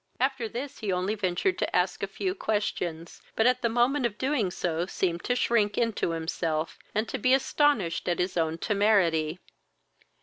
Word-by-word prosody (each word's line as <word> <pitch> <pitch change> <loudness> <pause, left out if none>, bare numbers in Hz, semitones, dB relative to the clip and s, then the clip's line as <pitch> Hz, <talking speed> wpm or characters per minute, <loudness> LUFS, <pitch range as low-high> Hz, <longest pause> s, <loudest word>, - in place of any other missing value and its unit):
After 260 -3 0
this 265 +5 -6
he 210 -3 -2
only 185 +3 0
ventured 205 - 0
to - - -1
ask - - +1
a - - -1
few 370 -1 -2
questions, 180 - -3
but 225 - +2
at 250 0 +3
the 235 - +1
moment 245 +3 +2
of 210 -2 -11
doing 260 -7 0
so 175 -1 -2
seemed 175 -3 -1
to 245 - +1
shrink 215 -4 +2
into 230 -6 0
himself, 160 -1 -2 0.2
and 215 +2 +1
to - - -4
be 255 +4 +4
astonished 270 - +1
at 175 - +1
his 180 +1 -1
own 165 -1 0
temerity. 180 -6 +2
205 Hz, 175 wpm, -27 LUFS, 175-245 Hz, 0.2 s, be